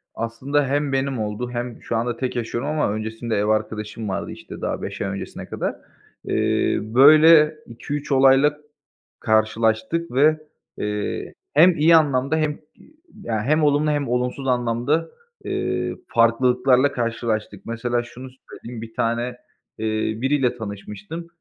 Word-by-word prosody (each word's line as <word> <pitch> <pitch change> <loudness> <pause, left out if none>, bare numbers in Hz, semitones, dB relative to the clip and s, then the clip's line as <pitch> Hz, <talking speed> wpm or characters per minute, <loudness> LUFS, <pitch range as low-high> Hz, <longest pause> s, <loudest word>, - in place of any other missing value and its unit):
Aslında 130 +6 -1
hem 145 +1 0
benim 135 -1 -1
oldu 110 +3 -3
hem 120 -1 -5
şu - - -3
anda 120 +1 -1
tek 130 -1 -3
yaşıyorum 120 +3 -3
ama 150 -8 0
öncesinde 110 +2 -3
ev 100 0 +1
arkadaşım 110 0 -2
vardı, 95 - -3
işte, - - -10
daha - - -3
5 - - -6
ay - - -1
öncesine 100 0 -6
kadar. - - -3 0.5
Eee, - - +1
böyle 150 +7 +6
2-3 145 +6 -6
olayla 135 +2 +5 0.6
karşılaştık 110 +8 +1
ve, 150 +5 +3 0.4
eee, 105 0 -3 0.2
hem 170 +4 +6
iyi 165 +2 +6
anlamda 140 -1 +2
hem, 155 -1 -1 0.2
iii, 310 - -22 0.3
ya 110 -2 -2
hem 155 +4 +2
olumlu 145 +1 +2
hem 145 -2 -1
olumsuz 125 +2 -2
anlamda, 125 +6 0 0.3
eee, - - -2
farklılıklarla 125 +3 +3
karşılaştık. 115 -4 -3
Mesela 120 +1 -1
şunu 125 +2 -10 0.2
söyleyeyim, 115 -1 -9
1 115 0 -10
tane, 120 +2 -1 0.4
eee, 110 - -3 0.4
biriyle 135 -2 +1
tanışmıştım. 105 - -7
125 Hz, 135 wpm, -22 LUFS, 115-145 Hz, 0.6 s, böyle